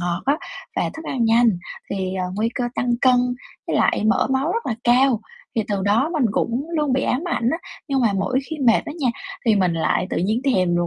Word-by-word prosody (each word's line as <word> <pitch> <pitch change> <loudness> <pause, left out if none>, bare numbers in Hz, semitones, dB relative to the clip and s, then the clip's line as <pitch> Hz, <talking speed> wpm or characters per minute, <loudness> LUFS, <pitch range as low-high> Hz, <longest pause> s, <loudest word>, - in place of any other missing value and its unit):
ngọt 175 -1 -2
á, 285 +2 +3 0.4
và - - 0
thức 320 - -8
ăn 255 -6 -1
nhanh 225 -3 +4 0.3
thì, 190 -1 -2
ờ, 185 - -1
nguy 220 +2 +1
cơ 245 - -1
tăng 245 -1 +1
cân 255 -1 +5 0.5
với - - 0
lại - - +2
mỡ 220 +2 +3
máu 270 +6 +1
rất 465 - -2
là 230 - 0
cao." 245 -1 +4 0.4
Thì 225 - +3
từ 200 -2 -1
đó 220 +10 +2
mình 305 -6 +1
cũng 250 +9 -1
luôn 295 -4 +1
bị 265 - +1
ám 255 - 0
ảnh 240 -7 +1
á, 325 - -1 0.3
nhưng 275 -1 +1
mà 225 -4 +3
mỗi 195 +6 0
khi 315 - -3
mệt 230 - +5
á 300 - -5
nha, 260 - +2 0.4
thì 220 - +5
mình 180 -3 +2
lại 165 +2 +1
tự - - -2
nhiên 215 +6 0
thèm 185 -10 +2
đồ 175 0 +1
235 Hz, 240 wpm, -22 LUFS, 200-270 Hz, 0.5 s, cân